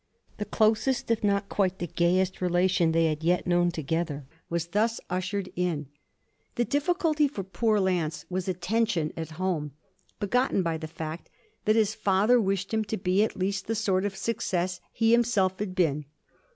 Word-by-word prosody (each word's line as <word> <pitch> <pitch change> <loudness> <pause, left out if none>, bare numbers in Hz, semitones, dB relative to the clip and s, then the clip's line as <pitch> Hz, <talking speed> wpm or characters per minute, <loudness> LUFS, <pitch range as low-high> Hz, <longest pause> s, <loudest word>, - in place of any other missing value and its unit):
The 210 - -3
closest 220 +4 +1
if 225 - 0
not 200 0 +1
quite 190 -2 0
the 175 - -3
gayest 180 +3 +1
relation 180 -1 +2
they 165 0 +3
had 155 0 -1
yet 175 +2 +2
known 175 0 +3
together 160 -2 -2 0.2
was 170 -1 -1
thus 220 +5 +1
ushered 185 +1 -2
in. 165 -6 -1 0.7
The 240 - +1
difficulty 305 +1 +1
for 210 -8 -5
poor 215 +3 +1
Lance 170 -5 0
was 185 0 -3
a 185 - 0
tension 180 -3 0
at 160 -2 -5
home 170 -6 -1 0.5
begotten 210 -1 +1
by 165 -1 -1
the 160 - -5
fact 160 +1 -7 0.4
that 215 0 +4
his 215 -2 +3
father 215 +3 +3
wished 195 0 -1
him 220 0 +2
to 215 +2 -3
be 185 +3 +2
at 220 - -2
least 195 +1 -2
the 225 - 0
sort 195 -4 +1
of 205 -1 -2
success 185 -4 -1
he 225 0 +2
himself 220 -6 +2
had 195 -3 -3
been. 150 -5 +1
190 Hz, 175 wpm, -27 LUFS, 175-215 Hz, 0.7 s, that